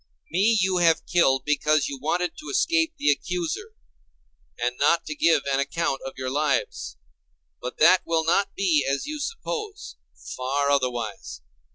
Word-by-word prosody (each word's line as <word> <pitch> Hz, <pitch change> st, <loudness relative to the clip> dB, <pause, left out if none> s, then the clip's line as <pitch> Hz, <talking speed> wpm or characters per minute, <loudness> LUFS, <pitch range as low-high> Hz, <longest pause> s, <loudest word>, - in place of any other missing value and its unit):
Me 205 Hz, +7 st, +3 dB
you 190 Hz, -1 st, +1 dB
have 165 Hz, -2 st, +3 dB
killed 135 Hz, -7 st, +2 dB
because 150 Hz, 0 st, +2 dB
you 140 Hz, -, -6 dB
wanted 175 Hz, +3 st, -1 dB
to 305 Hz, -, -9 dB
escape 330 Hz, -4 st, +1 dB
the 145 Hz, -, +3 dB
accuser, 180 Hz, -, -3 dB, 0.8 s
and 125 Hz, +1 st, -1 dB
not 170 Hz, -, +3 dB
to 155 Hz, -, -4 dB
give 155 Hz, -1 st, +3 dB
an 135 Hz, -, +1 dB
account 140 Hz, 0 st, -1 dB
of 135 Hz, -, -6 dB
your 130 Hz, 0 st, -3 dB
lives. 145 Hz, -, -1 dB, 0.6 s
But 125 Hz, -, -6 dB
that 175 Hz, +4 st, +6 dB
will 165 Hz, -1 st, 0 dB
not 195 Hz, +4 st, +1 dB
be 170 Hz, -7 st, +2 dB
as 140 Hz, 0 st, -1 dB
you 305 Hz, 0 st, -5 dB
suppose: 430 Hz, +2 st, -5 dB, 0.4 s
far 140 Hz, +2 st, 0 dB
otherwise. 120 Hz, -7 st, -2 dB
160 Hz, 155 wpm, -25 LUFS, 140-190 Hz, 0.8 s, that